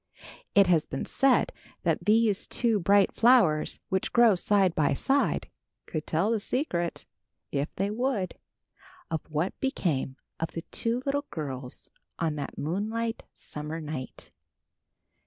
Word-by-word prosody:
It 200 -1 +7
has 170 -4 +3
been 135 - -4
said 270 -2 +3 0.3
that - - 0
these 215 -1 +3
two 230 -4 +1
bright 200 +2 +4
flowers, 225 -11 +4
which 190 0 -1
grow 235 -3 +6
side 190 -1 +2
by 145 -4 +2
side, 275 - +1 0.4
could 155 -2 -4
tell 175 +8 +1
the 225 - +1
secret, 190 - -2 0.5
if 140 +1 -1
they 195 +2 -1
would, 225 -4 -1 0.8
of 160 - -1
what 155 +4 -2
became 165 - -1 0.2
of 165 - -3
the 165 - -5
two 235 +2 -1
little 285 +1 0
girls 135 -5 -5 0.3
on 165 -2 0
that 145 - -5
moonlight 220 +8 -2
summer 150 +2 -6
night. 150 -5 -7
190 Hz, 135 wpm, -28 LUFS, 155-230 Hz, 0.8 s, It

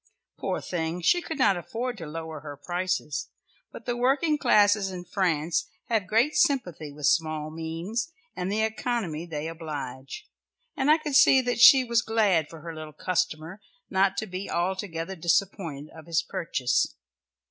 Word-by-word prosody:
Poor - - -2
thing 165 0 -3
she 350 - +3
could 320 - -5
not 230 -8 +4
afford 235 +8 -4
to 170 -7 -8
lower 160 0 -6
her 145 -1 -9
prices, 175 0 -2 0.4
but - - -11
the 240 - -1
working 275 +6 +2
classes 210 -7 +4
in 180 -1 -7
France 170 -3 0 0.2
have 220 -5 +1
great 230 +9 +2
sympathy 180 - +1
with 145 0 -5
small 155 +1 +1
means 165 - -4 0.2
and 180 +2 -3
the 215 +2 +1
economy 220 -7 -2
they 155 -1 -4
oblige, 155 - -7 0.5
and 280 -1 +1
I 310 - +7
could 305 -3 -5
see 295 -3 +7
that 245 -1 -1
she 260 +2 +9
was 235 -2 +2
glad 205 -10 +2
for 165 -2 -11
her 165 0 -7
little 155 -1 -8
customer 180 +2 -2 0.3
not 190 0 +2
to 220 - -1
be 185 0 -6
altogether 180 0 -2
disappointed 165 -3 -1
of 160 -1 -13
his 165 -1 +1
purchase. 130 -7 -1
180 Hz, 160 wpm, -27 LUFS, 160-225 Hz, 0.5 s, she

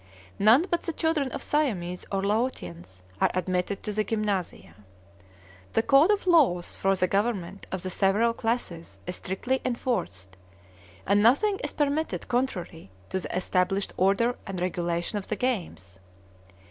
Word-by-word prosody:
None 225 - +6
but 345 - +1
the 335 - -4
children 315 -4 0
of - - -4
Siamese 190 - -1
or 195 -1 -1
Laotians 95 - -3 0.2
are - - +5
admitted 185 +2 -1
to 210 - -2
the 215 +1 0
gymnasia. 200 - -2 1.0
The 225 - +2
code 275 - +5
of 415 -2 +2
laws 275 - +3
for 195 0 +1
the 185 - +2
government 195 -2 -1
of 185 -2 -4
the 185 - -3
several 210 +5 +2
classes 225 -8 -3
is 180 0 -4
strictly 245 +8 -2
enforced, 170 - -2 0.7
and 200 +2 +3
nothing 380 - +4
is 295 - -3
permitted 295 +1 -1
contrary 205 - -2 0.2
to 190 - -1
the 180 - -4
established 185 +2 0
order 200 +6 +2
and 190 -2 -4
regulations 175 +2 -2
of - - -13
the 215 - 0
games. 175 - -3
200 Hz, 145 wpm, -27 LUFS, 180-250 Hz, 1.0 s, None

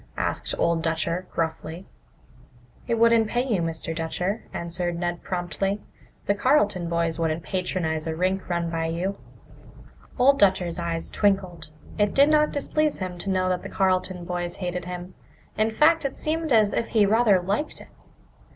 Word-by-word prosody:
asked - - -1
Old 170 -1 +1
Dutcher 165 +2 -1
gruffly. 165 +2 -3 1.0
"It 235 - +1
wouldn't 230 -1 +4
pay 240 +3 0
you, 215 -9 0
Mr. 165 0 -3
Dutcher," 180 +6 -2
answered 175 0 -2
Ned 175 0 -2
promptly. 195 +3 -2 0.5
"The 200 - +3
Carleton 205 - +2
boys 170 -1 0
wouldn't 160 0 -1
patronize 165 -4 -2
a 160 - -2
rink 185 +3 -1
run 170 -1 -1
by 165 -1 -1
you." 180 +4 -2 1.0
Old 275 +2 +5
Dutcher's 185 -3 +2
eyes 170 -1 -2
twinkled. 185 -6 0 0.3
It 205 0 +2
did 280 +2 +6
not 300 0 +4
displease 305 +1 0
him 180 -2 -5
to 195 - -4
know 185 -1 +1
that 180 -1 0
the - - -7
Carleton 185 -2 0
boys 175 0 -3
hated 180 -2 -4
him. 180 0 -7 0.4
In 215 +1 +2
fact, 310 +8 +4
it 275 -1 -3
seemed 320 0 -2
as 215 -3 +4
if 230 - 0
he 215 -3 +3
rather 215 -2 +4
liked 200 - -2
it. - - -13
185 Hz, 160 wpm, -25 LUFS, 170-215 Hz, 1.0 s, did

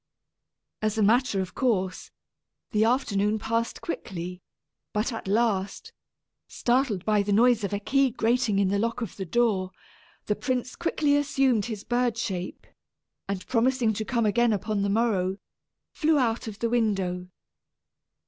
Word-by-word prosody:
As 215 0 0
a 215 - +3
matter 225 -1 +3
of 185 - -6
course, 190 -8 -1 0.6
the 215 0 +3
afternoon 220 -3 +1
passed 230 +2 -2
quickly; 180 - -5 0.5
but 215 +4 0
at 225 - -6
last, 210 - 0 0.5
startled 240 -6 0
by 210 -1 +3
the 200 +1 -2
noise 230 +1 +4
of 200 - -2
a 205 - 0
key 275 +5 +2
grating 230 -2 +1
in 195 -1 +2
the 200 +1 +1
lock 230 +3 -1
of 230 - -5
the 190 -2 -5
door, 210 -3 +1 0.6
the 210 - 0
prince 255 0 -2
quickly 305 -4 +1
assumed 270 -6 +2
his 215 -4 -5
bird 240 -1 0
shape, 185 -6 -4 0.6
and 195 -2 -3
promising 245 -1 +2
to 220 - -3
come 235 0 0
again 235 +3 +3
upon 210 0 -1
the 200 - 0
morrow, 200 -4 +1 0.5
flew 315 -1 +2
out 235 -4 0
of 210 -2 -6
the 230 +1 -1
window. 195 -6 0
220 Hz, 150 wpm, -26 LUFS, 200-245 Hz, 0.6 s, noise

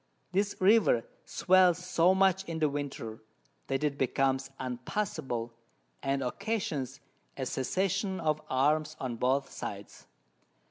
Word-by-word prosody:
This 200 +2 +1
River 190 - +5 0.2
swells 185 -2 +4
so 180 0 +3
much 190 0 +3
in 165 -2 -4
the 155 -2 +2
Winter, 140 -6 -5 0.5
that 135 +2 -1
it 145 -2 0
becomes 135 +1 +1
unpassable, 125 - -3 0.5
and 135 0 0
occasions 150 - -2 0.4
a - - -2
Cessation 190 - -1
of 155 -2 0
Arms 150 +4 +2
on 125 -3 -3
both 130 +4 +1
sides. - - -7
150 Hz, 120 wpm, -30 LUFS, 130-185 Hz, 0.5 s, River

